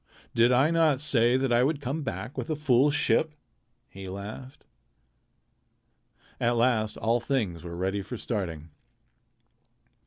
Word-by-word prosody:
"Did 115 +2 +4
I 135 +6 +4
not 160 -5 +3
say 125 -4 +2
that 130 -2 0
I 120 +1 +4
would 145 +2 0
come 140 +3 -3
back 130 -1 -5
with - - -5
a 155 - 0
full 140 -2 +3
ship?" 150 +1 +1 0.5
he 95 0 -10
laughed. 105 +7 -9 1.7
At 120 +1 +1
last 115 -3 +1
all 115 +2 +1
things 110 - -2
were 85 -1 -7
ready 95 +2 -1
for 105 +5 -7
starting. 85 -9 -4
120 Hz, 135 wpm, -27 LUFS, 105-140 Hz, 1.7 s, Did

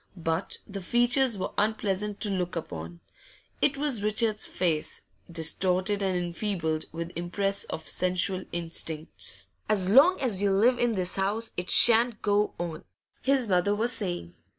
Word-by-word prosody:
But 165 -1 -1
the 195 -1 -7
features 240 +3 +2
were 185 - -4
unpleasant 210 -1 -1
to 210 - +1
look 180 -2 -2
upon; 85 - -7 0.6
it 280 -1 +2
was 280 -6 -1
Richard's 215 +1 +1
face, 165 -4 -2 0.3
distorted 185 +4 0
and 190 -2 0
enfeebled 175 -3 -2
with 170 +1 -6
impress 195 +3 -1
of 160 - -7
sensual 185 +1 0
instincts. 165 -2 -1 0.2
'As 195 -3 +1
long 300 - +6
as 220 -8 0
you 205 - +2
live 240 +6 +3
in 240 -2 +1
this 185 -1 -2
house, 210 +4 -1
it 180 +1 -4
shan't 235 -1 +6
go 205 0 +1
on,' 170 -2 -5 0.4
his 265 -3 +1
mother 190 +1 +2
was 230 +3 +1
saying. 180 - -2
195 Hz, 150 wpm, -27 LUFS, 175-220 Hz, 0.6 s, long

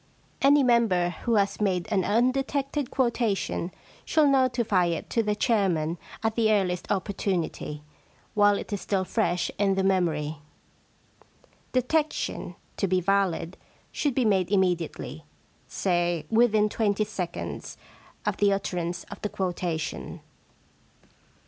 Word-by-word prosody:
Any 280 +1 +6
member 225 -8 +3 0.2
who 235 -2 +2
has 200 0 +1
made 185 -3 +1
an 195 -3 +2
undetected 270 +5 0
quota 235 -6 +1
tion 180 -1 -3 0.3
should 310 -3 +3
notify 240 -8 +2
it 170 -1 -3
to 230 - +2
the 210 -1 0
chairman 180 -8 +1 0.2
at 220 0 +1
the 220 -1 +2
earliest 185 -4 0
opportunity, 185 -6 -2 0.5
while 205 -1 +4
it - - -6
is 200 - -2
still 195 -2 0
fresh 180 -5 0
in 195 -1 +3
the 190 - +1
memory. 165 -5 +1 0.7
* - - -33
Detection, 295 +5 -1 0.2
to 195 - +1
be 185 0 +2
valid, 185 -2 0 0.3
should 285 -5 -1
be 255 - +2
made 190 -4 +2
immediately 180 -5 -1 0.3
— - - -36
say, 175 -3 0
within 220 -2 +4
twenty 210 -1 +1
seconds 180 -4 -5 0.5
of - - 0
the 205 -1 +3
utterance 175 -3 -2
of - - -8
the 210 - -2
quotation. 175 -5 -3
200 Hz, 130 wpm, -26 LUFS, 180-230 Hz, 0.7 s, Any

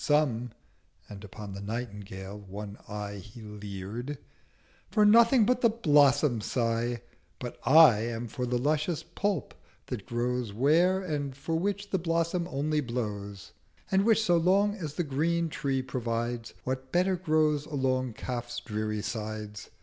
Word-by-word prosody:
Some'—and 120 -7 -2
upon 105 0 -8
the 100 - -7
Nightingale 100 -3 -6
one 100 +1 -8
Eye 105 -1 -5
He 105 +4 -11
leer'd—'for 105 - -5
nothing 230 +2 +6
but 250 +2 +2
the 235 - +5
Blossom 145 - +4
sigh: 115 +1 -1 0.3
But 120 -1 -7
I 145 -6 +8
am 120 0 -4
for 125 +3 -3
the 125 0 +1
luscious 150 +4 0
Pulp 195 +4 -2 0.3
that 120 -7 -6
grows 120 -2 -1
Where, 165 - +3
and 145 -6 -3
for 160 +4 -2
which 200 +4 -2
the 190 - +1
Blossom 170 +1 0
only 150 +1 0
blows: 105 -6 -5 0.4
And 195 0 +4
which 225 0 +4
so 175 -5 +4
long 195 +5 +3
as 160 -8 -6
the 175 - 0
Green 165 +4 0
Tree 135 -4 -1
provides 120 -2 -3
What 130 0 -4
better 185 +2 +2
grows 155 -4 +1
along 130 -4 0
Kaf's 120 0 -4
dreary 110 -1 -3
Sides? 110 -2 -5
130 Hz, 140 wpm, -29 LUFS, 110-165 Hz, 0.4 s, I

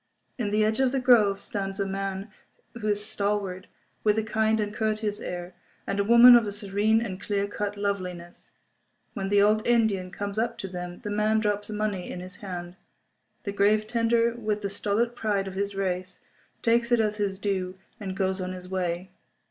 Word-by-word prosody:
In 220 -4 0
the 215 +1 +2
edge 220 +2 +1
of 265 -2 +3
the 270 - 0
grove 215 -6 +4
stand 195 -1 -4
a 200 - +1
man 195 +1 -4 0.4
who 230 -3 -5
is 205 0 0
stalwart, 200 -2 -2 0.4
with 210 0 +3
a 220 - +1
kind 220 0 +1
and 210 -1 -2
courteous 215 -1 -1
air, 175 0 -6 0.3
and 200 - -2
a - - +3
woman 235 +3 +9
of 235 -3 +4
a - - -2
serene 205 +2 +1
and 190 -3 -6
clear 200 -1 0
cut 205 0 -4
loveliness. 180 -4 -4 0.6
When 195 -1 -3
the 200 0 +5
old 215 +1 +3
Indian 220 -6 +2
comes 200 +2 -4
up 230 +1 -1
to 195 - -5
them 180 -1 -7
the 205 - -4
man 215 +1 +2
drops 205 -1 -1
money 210 -3 -2
in - - -5
his 180 0 -9
hand. 180 -2 -7 0.7
The 200 - -3
grave 210 +2 +3
tender, 230 +1 +2
with 215 -3 -2
the 200 - -2
stolid 210 +4 0
pride 205 -4 -1
of 190 - -6
his 200 +1 -2
race, 185 -1 -2 0.4
takes 235 +1 +2
it 240 - +5
as 210 -1 +1
his 200 -2 -1
due, 190 -2 -2 0.2
and 195 -3 -5
goes 190 -1 0
his 185 0 -5
way. 180 0 -2
205 Hz, 190 wpm, -27 LUFS, 190-215 Hz, 0.7 s, woman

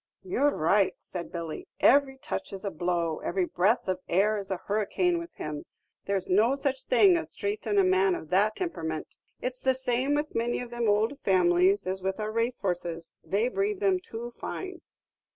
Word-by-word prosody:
"Yer' 360 -6 +2
right," 195 - +2
said 175 -2 -7
Billy; 165 -3 -5
"every 270 0 +4
touch - - -5
is 195 +1 -7
a 200 - -1
blow, 170 -1 -1
every 185 0 -1
breath 195 +7 +1
of 185 -1 -1
air 205 +4 +3
is 200 -2 -5
a 190 - -1
hurricane 280 - +1
with 335 0 -9
him. 150 -1 -5 0.4
There 200 0 +1
's 185 - -4
no 220 +8 +4
such 275 -1 -2
thing 395 -7 +6
as - - -6
traitin' 410 0 -2
a 395 - +6
man 375 0 +3
of 155 - -8
that 205 +4 +3
timperament; 160 - -4 0.3
it's 255 0 -3
the 260 -1 +2
same 260 +2 +1
with 295 +1 -2
many 235 +1 0
of 245 -1 -7
them 240 -1 -1
ould 220 +7 +1
families 185 +1 +3
as 190 +1 -2
with 190 +2 -2
our 215 0 -2
racehorses, 180 -8 -2
they 210 +5 +1
breed 395 +8 -1
them 385 -3 +2
too 240 -8 -7
fine." 370 +8 -6
220 Hz, 190 wpm, -28 LUFS, 185-285 Hz, 0.4 s, thing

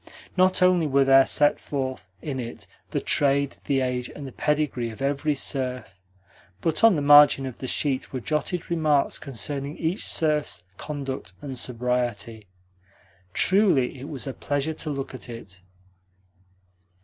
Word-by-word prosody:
Not 185 0 +3
only 180 -3 +4
were 140 -1 +3
there 135 0 +6
set 145 0 +3
forth 130 -8 -4
in 140 -4 -4
it 115 -3 -7 0.2
the - - -1
trade, 140 -1 +2
the 135 -2 +1
age, 125 -1 -2
and 145 - -9
the 135 - -7
pedigree 150 -5 -1
of 110 - -10
every 140 +2 0
serf, 130 -5 -2 0.7
but 165 - -1
on 225 -4 +7
the 145 - -1
margin 145 -1 +7
of 130 -3 -7
the 130 - -5
sheet 135 0 -1
were 130 - -3
jotted 160 +6 -2
remarks 155 -4 +1
concerning 140 +4 -4
each 165 +4 -2
serf's 150 - 0
conduct 135 -9 -6
and 135 -2 -7
sobriety. 120 -3 -2 0.9
Truly 180 -11 +3
it 140 +4 -8
was 140 -4 -3
a 135 - -4
pleasure 145 +5 -2
to 155 - -4
look 140 -2 -4
at 130 - -8
it. 100 -6 -10
140 Hz, 150 wpm, -25 LUFS, 125-150 Hz, 0.9 s, on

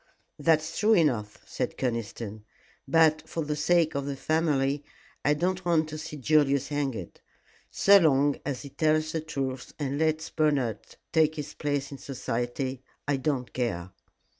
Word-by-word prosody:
"That's 155 +1 +2
true 220 +1 +5
enough," 120 - +1
said - - -3
Conniston; 115 -3 -3 0.4
"but 155 +1 +4
for 165 -2 -3
the 150 0 -1
sake 160 +1 +2
of 140 0 -2
the 140 - -2
family, 145 -2 +1 0.4
I 150 - +3
don't 185 +4 -1
want 160 -3 +2
to 155 0 -6
see 155 -1 -7
Julius 140 -1 +2
hanged. 135 - -3 0.5
So 200 0 +6
long 145 -4 +3
as 140 -2 -4
he 140 - -8
tells 155 +1 +1
the 160 - -2
truth 135 -5 -4
and 140 -1 -2
lets 160 0 0
Bernard 140 -9 +1 0.3
take 160 -1 +3
his 150 -1 -6
place 145 -1 -2
in 140 - -8
society 130 0 -3 0.3
I 145 -1 +2
don't 130 -3 -2
care." 95 -8 -2
145 Hz, 155 wpm, -28 LUFS, 135-155 Hz, 0.5 s, So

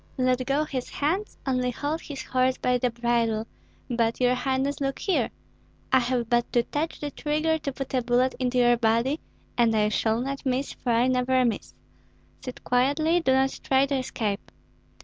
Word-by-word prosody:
Let 255 0 +2
go 280 +2 +2
his 265 -5 -4
hands, 360 +9 -2
only 255 -2 +1
hold 290 +6 -3
his 285 -3 -7
horse 255 0 +1
by 250 0 +1
the 250 - +1
bridle; 235 -2 0 0.4
but, 230 -2 0
your 250 0 +3
highness, 265 +3 -1
look 275 -1 -1
here! 390 - 0 0.6
I 260 - +6
have 245 -1 -1
but 240 0 +1
to 240 - +4
touch 305 +6 -3
the 295 -1 -4
trigger 310 +2 0
to 280 - -3
put 270 0 -6
a 255 - +2
bullet 245 +2 +2
into 250 -1 0
your 240 -1 +5
body, 230 +6 +1 0.4
and 230 -2 +4
I 210 -1 +3
shall 220 +1 +1
not 275 +2 -4
miss, 265 +1 -1
for 250 - -5
I 235 +1 +3
never 255 0 +2
miss. 235 - -3 0.7
Sit 255 - -8
quietly; 285 +7 +2
do 295 -6 +1
not 265 0 +1
try 270 0 +3
to 275 0 -1
escape." 215 -5 -3
255 Hz, 185 wpm, -26 LUFS, 240-275 Hz, 0.7 s, I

